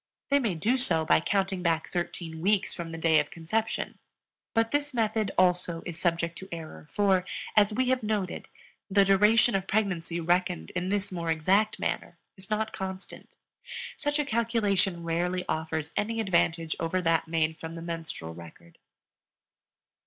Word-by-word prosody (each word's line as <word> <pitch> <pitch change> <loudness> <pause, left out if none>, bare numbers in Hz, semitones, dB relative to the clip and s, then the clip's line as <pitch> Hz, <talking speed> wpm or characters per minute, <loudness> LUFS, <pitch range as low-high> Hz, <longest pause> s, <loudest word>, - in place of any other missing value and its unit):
They 280 0 +4
may 220 -9 0
do 230 +11 +1
so 165 -10 +2
by - - +5
counting 195 +2 0
back 165 -2 0
thirteen 170 -2 -4
weeks 195 +2 +2
from 170 -2 -6
the 165 - -5
day 160 -1 +4
of 150 - -1
conception; 215 +7 -2 0.6
but 225 0 +2
this 290 -1 -1
method 220 -2 +1
also 180 -2 +2
is 170 -2 -6
subject 170 -1 0
to 190 - -10
error 160 -2 -8
for, 195 -3 +2 0.3
as 210 0 +5
we 255 +4 +1
have 260 0 +2
noted, 210 -4 -2 0.4
the 200 0 +5
duration 210 +5 +5
of 195 -1 0
pregnancy 180 -5 0
reckoned 170 - 0
in 180 +1 -2
this 200 0 -1
more 170 -2 -3
exact 190 +7 +2
manner - - -3 0.2
is 190 -1 -15
not 215 +1 -1
constant. 190 0 -7 0.6
Such 290 +1 -1
a 295 - +1
calculation 210 -7 +1
rarely 175 +2 -1
offers 160 0 -2
any 225 +2 -1
advantage 170 -5 +1
over 165 +3 0
that 165 -1 +2
made 160 -1 0
from 165 0 -6
the 165 - -7
menstrual 165 - -5
record. 85 0 -13
185 Hz, 160 wpm, -28 LUFS, 165-210 Hz, 0.6 s, by